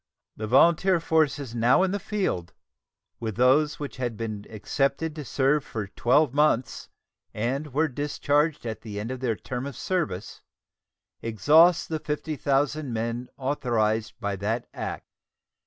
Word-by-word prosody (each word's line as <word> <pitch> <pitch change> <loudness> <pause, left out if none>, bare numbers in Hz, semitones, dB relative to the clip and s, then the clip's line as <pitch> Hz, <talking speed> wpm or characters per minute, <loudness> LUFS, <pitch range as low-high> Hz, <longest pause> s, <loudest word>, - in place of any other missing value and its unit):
The 110 - -5
volunteer 170 - +4
forces 150 -6 +1
now 120 +9 +4
in 190 - +1
the 205 - -1
field, 185 - -2 0.7
with 110 -3 -4
those 135 +5 +3
which 145 -3 -6
had 120 -4 -3
been 110 -3 -5
"accepted" 140 +8 -1
to 150 - -5
"serve 135 +3 +1
for 110 -6 -5
twelve 130 +6 +2
months" 145 -4 +1 0.5
and 135 +7 -2
were 155 +5 +2
discharged 145 +1 0
at 110 -1 -4
the 105 -3 -6
end 110 +4 -4
of 130 - -5
their 120 -3 0
term 125 +5 -5
of 140 - -7
service, 165 - -3 0.8
exhaust 155 - +4
the 160 -1 -2
50,000 150 -2 -1
men 115 +2 -3
authorized 115 -5 0
by 100 -1 -2
that 110 +5 -2
act. - - -5
130 Hz, 140 wpm, -26 LUFS, 115-150 Hz, 0.8 s, volunteer